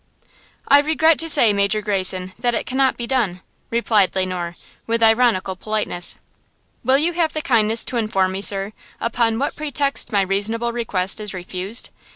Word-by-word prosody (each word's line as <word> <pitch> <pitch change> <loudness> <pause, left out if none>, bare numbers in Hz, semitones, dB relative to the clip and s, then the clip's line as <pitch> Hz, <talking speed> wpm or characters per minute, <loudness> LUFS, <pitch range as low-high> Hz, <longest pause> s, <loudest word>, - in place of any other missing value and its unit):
"I 285 - +7
regret 315 +1 +2
to 330 - 0
say, 240 -9 +6
Major 200 +1 +1
Greyson, 185 -3 0
that 240 -1 0
it - - -2
cannot 265 0 0
be 235 - -4
done," 225 -9 -1 0.3
replied 220 -4 +1
Le 190 0 +1
Noir, 175 -2 -5 0.3
with 230 0 0
ironical 220 -5 +2
politeness. 210 -3 -2 0.7
"Will 260 +3 +3
you 330 +5 0
have 330 -2 0
the 310 - -2
kindness 225 -2 +2
to 250 - -3
inform 195 -4 0
me, 190 +1 -4
sir, 200 +1 -1 0.3
upon 230 -1 0
what 280 +4 -2
pretext 285 -2 -1
my 200 -2 +2
reasonable 220 +5 -1
request 205 -4 -1
is 210 -2 -5
refused?" 185 +5 -2
220 Hz, 170 wpm, -20 LUFS, 195-250 Hz, 0.7 s, I